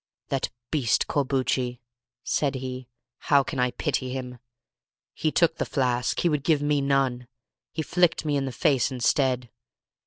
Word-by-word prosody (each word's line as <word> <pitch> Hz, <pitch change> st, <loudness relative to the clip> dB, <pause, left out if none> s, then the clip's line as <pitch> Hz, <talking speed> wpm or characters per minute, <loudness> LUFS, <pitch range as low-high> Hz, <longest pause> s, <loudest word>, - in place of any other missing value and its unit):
"That 135 Hz, -1 st, -1 dB, 0.2 s
beast 130 Hz, -9 st, +2 dB
Corbucci!" 130 Hz, -3 st, 0 dB, 0.4 s
said 140 Hz, -2 st, 0 dB
he—"how 130 Hz, +1 st, -1 dB
can 135 Hz, -, -5 dB
I 125 Hz, 0 st, +3 dB
pity 130 Hz, -1 st, -2 dB
him? 125 Hz, -1 st, -5 dB, 0.7 s
He 155 Hz, -, -1 dB
took 165 Hz, 0 st, +2 dB
the -, -, 0 dB
flask; 125 Hz, -3 st, 0 dB
he -, -, +2 dB
would 150 Hz, -4 st, 0 dB
give 155 Hz, -1 st, +3 dB
me 145 Hz, -1 st, +2 dB
none; 135 Hz, -3 st, +1 dB, 0.4 s
he 160 Hz, -, -3 dB
flicked 175 Hz, 0 st, +2 dB
me 150 Hz, -1 st, +1 dB
in 140 Hz, -1 st, 0 dB
the 135 Hz, -, -3 dB
face 135 Hz, 0 st, +2 dB
instead. 125 Hz, -1 st, +1 dB
135 Hz, 150 wpm, -26 LUFS, 125-145 Hz, 0.7 s, I